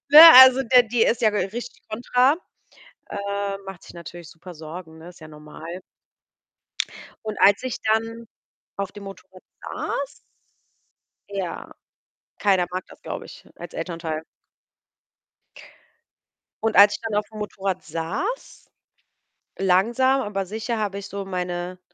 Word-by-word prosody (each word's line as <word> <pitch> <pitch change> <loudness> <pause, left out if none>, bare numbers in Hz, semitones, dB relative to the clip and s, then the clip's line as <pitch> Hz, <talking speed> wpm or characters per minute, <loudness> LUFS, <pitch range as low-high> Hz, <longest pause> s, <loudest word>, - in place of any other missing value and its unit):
Ne, 300 +2 +11 0.2
also 260 +1 +6
der 250 0 +6
die 225 +1 0
ist 235 +1 +1
ja 215 - +5
richtig 210 +5 -4
kontra. 250 +5 +2 0.7
Äh, 200 0 -3
macht 195 -2 -9
sich - - -13
natürlich 170 0 -10
super 175 +2 -12
Sorgen, 160 +1 -9
ne, 170 +2 -11
ist 175 - -16
ja 155 - -11
normal. 155 +4 -10 1.4
Und 215 -1 -4
als 200 +5 +5
ich 255 - -3
dann 225 +1 -1 0.5
auf 200 -1 -3
dem 205 - -11
Motorrad 190 -1 -12 0.2
saß 280 0 -4 1.2
Ja, 195 -3 -5 0.7
keiner 190 -4 +2
mag 185 +1 -3
das, - - -17
glaube - - -6
ich, - - -13
als 175 - -10
Elternteil. 165 -2 -4 2.4
Und 225 - 0
als 205 +1 +8
ich - - -10
dann 220 -2 -3
aufm 215 +1 -9
Motorrad 195 -3 -3
saß, 165 - -5 0.9
langsam, 235 +9 +3
aber 195 -3 -3
sicher 220 +4 -4
habe 205 -2 -2
ich 200 - -8
so 200 0 -5
meine 180 -1 -4
200 Hz, 130 wpm, -23 LUFS, 175-225 Hz, 2.4 s, Ne